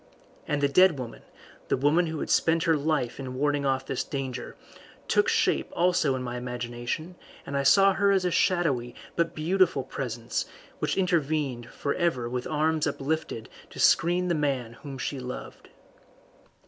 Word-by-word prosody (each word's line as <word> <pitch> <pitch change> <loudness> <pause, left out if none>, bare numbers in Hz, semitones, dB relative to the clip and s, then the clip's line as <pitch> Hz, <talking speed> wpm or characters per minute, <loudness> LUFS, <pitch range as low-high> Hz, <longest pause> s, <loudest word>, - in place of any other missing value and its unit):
And 150 -1 0
the - - +5
dead 175 +2 +5
woman, 125 -3 -7 0.5
the - - +1
woman 150 +6 +3
who 160 -2 -4
had - - -3
spent 165 0 +3
her 165 -2 +3
life 145 -5 -1
in 130 -1 -5
warding 145 +1 +1
off 135 0 0
this - - -2
danger, 130 -3 -5 0.5
took - - +3
shape - - +1
also 175 -5 +2
to 130 - -2
my 125 0 -4
imagination, 125 +6 -4 0.3
and 140 - -5
I 140 - +2
saw 195 +8 +6
her 200 +1 +2
as 190 -2 +3
a 180 - +1
shadowy 140 -11 +1 0.2
but 170 0 0
beautiful 170 -2 +2
presence 120 -4 -4 0.3
which - - -1
intervened 150 -9 0
for 140 - -2
ever 160 -9 0
with 125 +1 -3
arms 155 0 +1
uplifted 145 -4 -3 0.2
to - - -11
screen 175 +2 +4
the 175 - +1
man 135 -7 -1
whom 140 -2 -7
she 135 +1 -3
loved. 125 0 -8
145 Hz, 165 wpm, -27 LUFS, 125-165 Hz, 0.5 s, saw